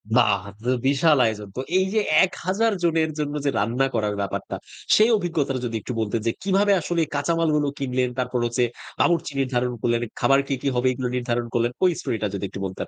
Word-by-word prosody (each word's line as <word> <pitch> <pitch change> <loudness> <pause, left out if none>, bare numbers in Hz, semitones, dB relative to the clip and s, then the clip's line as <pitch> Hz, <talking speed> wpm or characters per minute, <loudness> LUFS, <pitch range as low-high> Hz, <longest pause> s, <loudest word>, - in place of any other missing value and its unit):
বাহ! 100 -3 +4
তা 100 - -9
তো 125 - -1 0.2
বিশাল 145 +2 +4
আয়োজন 105 -2 -2
তো। - - -4 0.2
এই 190 - +3
যে 220 - +3 0.3
১০০০ 195 +5 -1
জনের 160 -2 +2
জন্য 145 -1 -2
যে - - +3
রান্না 120 +6 +1
করার 105 -2 0
ব্যাপারটা, 100 - -4 0.4
সেই 215 +2 +5
অভিজ্ঞতাটা 150 -8 -1
যদি 115 -1 -3
একটু 125 - -5
বলতেন 110 0 -1
যে - - +3
কিভাবে 200 +1 +3
আসলে 170 +1 -1
কাঁচামালগুলো 150 0 +1
কিনলেন? 130 -2 0
তারপর 125 0 -1
হচ্ছে 120 +1 +1 0.4
বাবুর্চি 170 -4 +2
নির্ধারণ 125 -2 0
করলেন, 120 0 +1 0.2
খাবার 135 0 +4
কি, - - -1
কি - - -2
হবে? 125 +1 +2
এগুলো 125 0 -3
নির্ধারণ 120 -1 -1
করলেন, 120 0 +1
ঐ - - +7
স্টোরিটা 110 -2 -2
যদি 100 - -4
একটু 100 - -8
বলতেন! 95 -1 -5
130 Hz, 195 wpm, -23 LUFS, 115-160 Hz, 0.4 s, ঐ